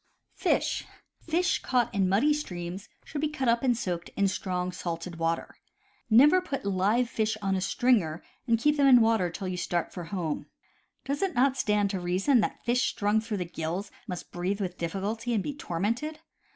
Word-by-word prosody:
Fish - - +1 0.8
caught 250 -3 +1
in 195 -2 +2
muddy 245 +11 +4
streams 185 -8 -5 0.2
should 290 - -4
be 305 - +1
cut 270 -4 -2
up 235 0 +3
and 245 -3 +2
soaked 175 -6 -3
in 200 - +3
strong 185 -1 -2
salted 170 -1 -5
water. 165 0 -2 0.5
Never 290 +11 +7
put 275 - -4
live 200 +5 +2
fish 220 -2 -1
on 195 -2 0
a 190 - -1
stringer 195 -9 +1 0.2
and 230 -1 +4
keep 295 +6 +2
them 280 -1 +5
in 255 -2 +8
water 225 -5 +3
till 185 +3 -5
you 185 -1 -3
start 175 -1 -2
for 175 -2 -6
home. 165 -3 -3 0.6
Does 280 +1 -2
it 385 -2 0
not 265 +2 +3
stand 210 -5 +1
to 195 - -2
reason 185 +9 +2
that - - -2
fish 240 +1 +2
strung 210 +1 +1
through 220 -2 -3
the 180 - -2
gills 170 +3 -4 0.2
must 180 -1 -6
breathe 185 +3 -2
with 180 -3 -4
difficulty 210 +7 -2
and 200 - 0
be 290 - -3
tormented? 235 - -2
205 Hz, 185 wpm, -28 LUFS, 180-245 Hz, 0.8 s, in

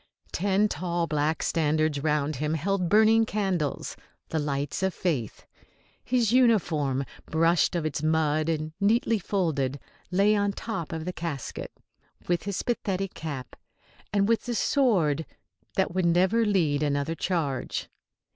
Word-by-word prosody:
Ten 200 +3 +2
tall 175 -1 -1
black 155 0 0
standards 155 -2 +1
round 150 -1 0
him 150 +3 -1
held 180 +2 0
burning 220 +2 +5
candles, 190 -9 -2 0.3
the 160 - -1
lights 145 0 -2
of 190 -2 0
faith. 140 - -2 0.6
His 240 -3 +1
uniform, 165 - +2 0.2
brushed 165 +2 +2
of 170 -2 -1
its 145 -2 -2
mud 155 0 +1
and 155 -1 -2
neatly 225 +2 +2
folded, 155 -9 -1 0.3
lay 200 +4 +3
on 205 -1 +1
top 190 -7 -5
of 160 -1 -4
the 180 - -3
casket, 160 -7 -5 0.6
with 175 +1 0
his 200 -2 -2
pathetic 195 -5 -2
cap 140 -6 -6 0.6
and 200 -1 +2
with 230 0 +1
the 240 -1 -2
sword 185 - +2 0.5
that 190 -2 +1
would 185 -1 +1
never 185 +7 +3
lead 160 -8 +2
another 145 +1 0
charge. 155 -7 -2
170 Hz, 135 wpm, -27 LUFS, 150-200 Hz, 0.6 s, burning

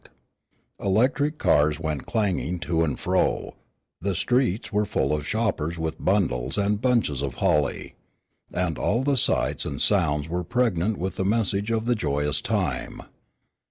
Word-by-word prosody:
The - - -8
electric 135 +9 +2
cars 75 - +3
went 80 -3 -3
clanging 95 -5 0
to 80 -1 0
and 75 -4 -2
fro, - - 0 0.5
the 100 +1 -1
streets 120 0 0
were 105 +1 +2
full 75 -7 0
of 75 -1 -2
shoppers 95 -7 -1
with 80 -1 -4
bundles 75 -10 +1
and 100 +1 +1
bunches 115 - +1
of 70 -3 -3
holly, 75 -7 0 0.6
and 90 -4 -1
all 115 +5 +1
the 140 0 +2
sights 125 - +1
and - - -4
sounds 75 +1 +2
were 90 +2 -2
pregnant 110 -3 0
with 95 +1 -4
the - - 0
message 100 0 0
of 115 -1 0
the 120 - +3
joyous 75 -7 0
time. - - -2
95 Hz, 155 wpm, -25 LUFS, 75-110 Hz, 0.6 s, cars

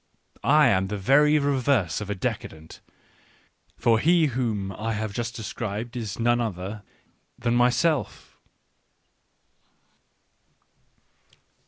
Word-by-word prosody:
I 150 +6 +5
am 95 0 +1
the 105 +1 -4
very 145 +9 +4
reverse 135 - +1
of 105 - -6
a 105 - -2
decadent, 80 -4 -6 1.0
for 115 -1 +3
he 165 +4 +4
whom 110 -6 -2
I 110 +3 -3
have 105 -1 -4
just 120 +2 -4
described 110 +1 -5
is 110 -4 -5
none 120 +1 +2
other 100 -1 -4 0.6
than 120 -1 -1
myself. 125 +6 0
115 Hz, 105 wpm, -25 LUFS, 100-130 Hz, 1.0 s, I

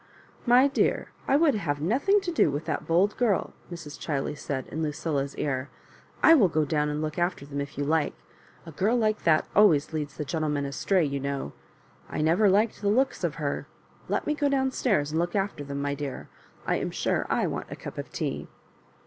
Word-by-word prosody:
"My 250 +3 +6
dear, 280 - 0 0.2
I 275 - +4
would 300 -1 +4
have 160 -9 -2
nothing 275 - +2
to 370 -2 -3
do 315 - +3
with 145 +3 -3
that 155 - -3
bold 180 +5 +3
girl," 225 -6 +1 0.2
Mrs. 165 -4 -8
Chiley 145 -1 -2
said 140 -2 -4
in 160 - -4
Lucilla's 150 -2 -2
ear. 135 -1 -2 0.3
" - - -27
I 325 - +9
will 245 - +6
go 155 -2 +1
down 150 0 0
and 150 +1 -2
look 155 +2 -3
after 175 -4 -1
them 140 0 -4
if 140 -1 -7
you 145 - 0
like. 155 +1 +1 0.5
A 165 - -9
girl 205 +10 +1
like 215 -2 0
that 155 -2 +4
always 165 -8 +5
leads 150 -2 -4
the 150 - -3
gentlemen 150 -2 -1
astray, 170 +5 +1
you 140 -1 -2
know. 140 - -3 0.6
I - - -2
never 170 +7 +4
liked 210 +4 +2
the 200 - +1
looks 260 +6 +1
of - - 0
her. - - -3 0.4
Let - - 0
me 300 - +1
go 290 -1 +1
down 265 -1 +1
stairs 175 - +1
and 160 - 0
look 175 +2 -1
after 195 -6 -1
them, 140 0 -4
my 145 0 -1
dear. 140 -2 -6 0.4
I - - +1
am - - -2
sure - - -1
I - - +1
want - - -4
a - - -6
cup - - -8
of - - -6
tea." - - -3
160 Hz, 215 wpm, -27 LUFS, 145-210 Hz, 0.6 s, I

